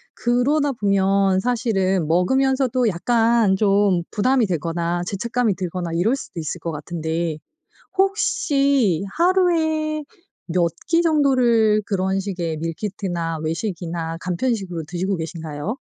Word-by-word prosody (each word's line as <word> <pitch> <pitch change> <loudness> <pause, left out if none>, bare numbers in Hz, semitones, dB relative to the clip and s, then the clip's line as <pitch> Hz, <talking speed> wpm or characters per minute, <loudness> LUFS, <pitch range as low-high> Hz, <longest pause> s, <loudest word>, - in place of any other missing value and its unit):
그러다 275 +5 +1
보면 195 -2 +2
사실은 195 -7 0
먹으면서도 255 - +2
약간 225 +1 +2
좀 195 -3 +2
부담이 250 +2 +2
되거나 170 0 -2
죄책감이 230 +1 0
들거나 180 -2 -4
이럴 215 +10 +2
수도 175 - -8
있을 160 +2 -4
것 165 0 -4
같은데 160 +1 -3 0.6
혹시 280 - +2
하루에 320 -4 +2 0.4
몇 170 -1 +1 0.2
끼 335 0 +3
정도를 250 -9 +3
그런 190 -1 0
식의 175 -5 -3
밀키트나 170 -1 -3
외식이나 165 -2 -3
간편식으로 185 -2 -2
드시고 185 +3 -2
계신가요? 160 - -5
195 Hz, 275 characters per minute, -21 LUFS, 170-250 Hz, 0.6 s, 끼